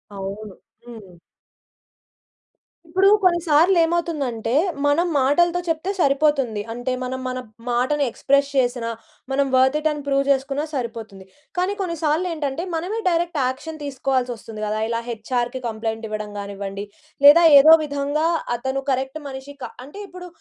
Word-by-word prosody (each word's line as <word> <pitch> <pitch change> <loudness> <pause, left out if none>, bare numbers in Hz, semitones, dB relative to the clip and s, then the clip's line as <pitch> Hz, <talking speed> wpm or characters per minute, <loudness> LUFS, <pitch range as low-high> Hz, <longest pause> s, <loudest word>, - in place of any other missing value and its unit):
అవును. 195 +1 -7 0.3
హ్మ్. 210 -7 -12 1.7
ఇప్పుడు 375 +4 +3 0.2
కొన్ని 350 -2 +4
సార్లు 325 +5 +4
ఏమవుతుందంటే, 295 -9 -1 0.3
మనం 305 +5 +2
మాటలతో 345 +6 +3
చెప్తే 330 +3 -1
సరిపోతుంది. 275 -7 +2
అంటే 245 +2 -3
మనం 255 +1 -4
మన 255 0 -3 0.3
మాటని 255 +5 +1
ఎక్స్‌ప్రెస్ 280 +4 +1
చేసినా, 245 -2 0 0.4
మనం 275 +1 +1
వర్త్ 260 +3 +4
ఇట్ 310 +1 +1
అని 295 -1 -5
ప్రూవ్ 275 0 +2
జేసుకున్నా 275 +2 0
సరిపోతుంది. 225 -7 -6 0.3
కానీ 365 +3 +1
కొన్ని 345 -3 -2
సార్లు 315 +4 +1
ఏంటంటే, 300 +1 -3
మనమే 365 +8 -3
డైరెక్ట్ 340 -2 -1
యాక్షన్ 305 +4 -6
తీసుకోవాల్సి 265 -2 -1
వస్తుంది 220 -1 -9
గదా! 210 +1 -2
ఇలా 230 0 -1
హెచ్ఆర్‌కి 240 +2 -3
కంప్లెయింట్ 225 0 -4
ఇవ్వడం 215 -1 -5
గానివ్వండి. 200 0 -6 0.4
లేదా 320 +4 +9 0.2
ఏదో 310 +3 +8
విధంగా 285 +2 -1 0.3
అతను 265 +2 -3
కరెక్ట్ 265 +3 -2
మనిషి 265 +1 -8
కా - - -3 0.2
అంటే 295 +9 -11
ఇప్పుడు 360 -1 -10
270 Hz, 140 wpm, -22 LUFS, 235-315 Hz, 1.7 s, లేదా